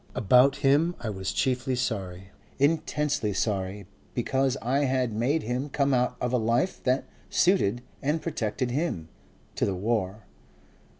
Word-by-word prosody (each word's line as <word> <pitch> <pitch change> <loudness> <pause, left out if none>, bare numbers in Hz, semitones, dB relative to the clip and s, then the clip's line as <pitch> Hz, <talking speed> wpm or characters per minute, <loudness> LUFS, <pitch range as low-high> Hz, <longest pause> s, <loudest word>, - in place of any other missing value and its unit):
About 125 +6 +5
him 155 +6 +4
I 115 -2 -3
was 95 -1 -3
chiefly 130 -1 0
sorry, 95 -6 -3 0.3
intensely 145 -6 +1
sorry, 100 -1 -2 0.3
because 135 0 +1
I 135 +5 +1
had 130 -3 0
made 130 +9 +1
him 125 +5 -2
come 140 0 +1
out 125 0 +1
of 125 0 -1
a 125 - +3
life 115 +10 0
that 130 +1 +2 0.3
suited 125 - +2 0.2
and 150 +4 0
protected 125 -5 -2
him, 125 - -2 0.4
to - - -2
the 95 - +1
war. 105 0 -2
125 Hz, 140 wpm, -27 LUFS, 105-140 Hz, 0.4 s, About